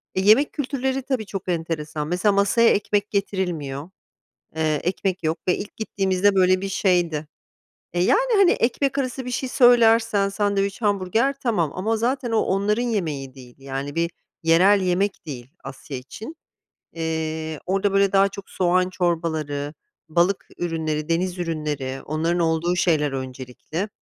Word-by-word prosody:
E, 190 - +1
yemek 220 +9 +5
kültürleri, 270 -1 -2
tabii 260 -4 -2
çok 195 -1 -6
enteresan. 160 -3 -3
Mesela, 180 +5 +2
masaya 200 +4 +4
ekmek 205 0 0
getirilmiyor. 175 -8 -2 0.7
Eee, 155 -2 0
ekmek 185 +1 -1
yok 160 +1 0
ve 180 - +3
ilk 205 - -7
gittiğimizde 195 -2 +1
böyle 185 0 +4
bir 195 - -3
şeydi 175 -6 +1 0.7
E, 175 - -1
yani, - - +3
hani, 395 -3 +6
ekmek 275 +4 0
arası 260 -1 -2
bir 250 - -4
şey 255 +1 -2
söylersen, 230 -5 +4
sandviç, 200 0 -1
hamburger 205 +5 +1
tamam 180 - +1
ama 220 +5 -1
zaten 245 +2 -1
o, 225 - +2
onların 200 +4 +1
yemeği 155 - -2
değil. 125 -2 -13
Yani 135 +1 -5
bir 170 +1 0 0.3
yerel 185 +5 +5
yemek 190 +2 0
değil, 125 -5 -7 0.2
Asya 135 0 -7
için. 215 - -9 0.6
Eee, 160 -1 -3
orada 195 +1 0
böyle 195 0 +3
daha 195 0 +4
çok 195 0 -10
soğan 180 0 +1
çorbaları, 160 -5 -2 0.4
balık 175 +4 +1
ürünleri, 160 -2 -2
deniz 180 +2 0
ürünleri, 150 -5 -3
onların 165 +3 0
olduğu 165 +1 +1
şeyler 155 -5 +2
öncelikli. 130 - -5
185 Hz, 145 wpm, -23 LUFS, 160-205 Hz, 0.7 s, hani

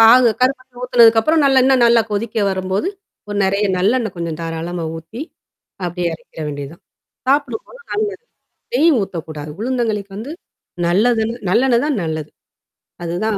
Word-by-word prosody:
பாகு 235 +2 +8
கருப்பட்டி 255 0 0
ஊத்துனதுக்கப்புறம் 240 +5 +5
நல்ல 270 -1 +5
இன்ன 270 - +5
நல்லா 235 0 +6
கொதிக்க 210 +2 -3
வரும்போது. 190 - -1 0.4
ஓ - - -7
நெறைய 200 +2 +1
நல்லெண்ணெய் 220 +1 +1
கொஞ்சம் 165 -2 -4
தாராளமா 165 +1 -4
ஊத்தி. 165 +9 -9 0.6
அப்படியே 175 0 -2
எறக்கிற 160 - -13
வேண்டியதான். 145 +3 -7 0.5
சாப்பிட 285 +1 +2
போல - - -14 0.2
நல்லது. 420 +1 -2 0.5
நெய் 335 -7 +5
ஊத்தக்கூடாது. 160 -6 -5
உளுந்தங்களிக்கு 225 -5 -1
வந்து. 240 +9 -6 0.5
நல்லதுன் 220 +5 +2 0.2
நல்லெண்ணெய் 240 +4 +3
தான் 285 -8 0
நல்லது. 155 -1 -4 0.7
அதுதான் 185 +6 -1
220 Hz, 130 wpm, -19 LUFS, 175-250 Hz, 0.7 s, பாகு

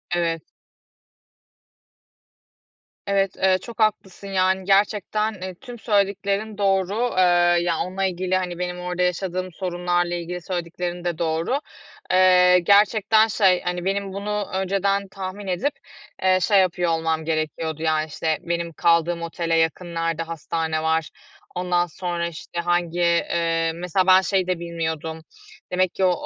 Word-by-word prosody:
Evet. 165 -2 -2 2.5
Evet. 195 -1 0
Eee, 190 0 +3
çok 235 +2 -10
haklısın, 200 -3 -1
yani, 190 0 +1
gerçekten, 210 +2 +1
eee, 185 0 -5
tüm 245 -3 -10
söylediklerin 200 0 0
doğru. 200 +4 +1
Eee, 175 -1 +4
ya 170 -2 0
onunla 190 +2 -2
ilgili, 185 0 -1
hani, 180 -2 -4
benim 180 0 -3
orada 180 0 -3
yaşadığım 185 0 -2
sorunlarla 175 0 -1
ilgili 175 +1 -5
söylediklerin 175 0 -4
de 175 -2 -2
doğru. 165 - 0 0.5
Eee, 180 -1 +6
gerçekten 210 +3 +4
şey, 195 -4 +3
hani, 180 0 -3
benim 195 0 -1
bunu 205 +1 -3
önceden 195 +1 0
tahmin 195 +1 -7
edip, 190 +11 -1 0.5
eee, 185 0 +4
şey 200 +2 +4
yapıyor 180 -2 +1
olmam 160 -1 -1
gerekiyordu, 155 0 -2
yani, 155 -1 +1
işte, 155 0 -1
benim 170 -1 -3
kaldığım 170 +1 +2
otele 170 0 -2
yakın 165 +2 0
nerede 165 0 -1
hastane 160 -1 -3
var? 160 0 +1 0.5
Ondan 180 -1 +1
sonra, 175 0 -3
işte, 170 +1 -7
hangi 175 0 0
eee, 170 -1 +1
mesela 180 +2 0
ben 185 0 +7
şeyi 190 -1 0
de 180 -2 -1
bilmiyordum, 160 -1 -4 0.5
demek 185 0 +1
ki 190 - -1
o 185 - +4
180 Hz, 135 wpm, -23 LUFS, 170-195 Hz, 2.5 s, ben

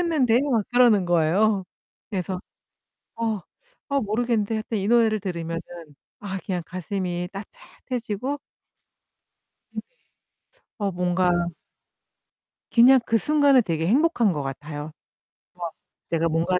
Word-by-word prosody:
있는데?" 275 -9 +3
막 230 -4 +3
그러는 240 -6 +5
거예요. 180 +4 +2 0.5
그래서 185 -1 -3 0.8
어, 225 -3 -1 0.5
어 280 0 +1
모르겠는데 225 0 0
하여튼 220 0 -3
이 195 +2 -1
노래를 225 -3 +4
들으면은 170 -3 -3 0.6
아 195 -2 -4
그냥 180 -3 -1
가슴이 180 0 -3
따뜻해지고 250 - -5 1.3
네네. - - -3 1.0
어 200 -2 -1
뭔가 180 -1 +1 1.3
그냥 250 +3 +7
그 225 - +3
순간에 285 +2 +4
되게 165 -4 -1
행복한 245 - +3
것 150 -3 -3
같아요. 145 +2 -6 0.6
막 170 -2 -5 0.4
내가 165 0 +1
뭔가를 170 +3 +1
200 Hz, 245 characters per minute, -24 LUFS, 175-235 Hz, 1.3 s, 그냥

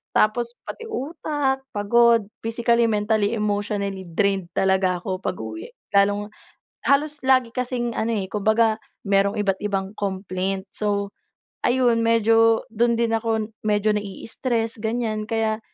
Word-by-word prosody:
Tapos 235 +2 +2 0.2
pati 460 - -7
utak, 290 -5 -2
pagod 230 +1 +4 0.2
physically, 235 +1 +2
mentally, 210 -1 +1
emotionally 205 -2 -2
drained 195 +1 0
talaga 190 -2 +2
ako 185 +1 -3
pag-uwi. 110 0 -5 0.2
Lalong 205 +1 +3 0.6
halos 290 +1 +2
lagi 255 -3 +4
kasing 245 -2 -2
ano 225 - -1
eh, 200 -3 -2
kumbaga 220 +2 +2 0.3
merong 200 +1 +2
iba't-ibang 195 0 -1
complaint, 190 0 -3
so 200 -1 -1 0.5
ayun 245 -2 +3
medyo 225 0 +4
dun 235 +1 +2
din 230 -1 +1
ako 225 -1 -1 0.2
medyo 210 0 +2
na-i-istress 225 +3 -2
ganiyan 220 -1 -2
kaya 220 -1 0
215 Hz, 120 wpm, -23 LUFS, 200-235 Hz, 0.6 s, pagod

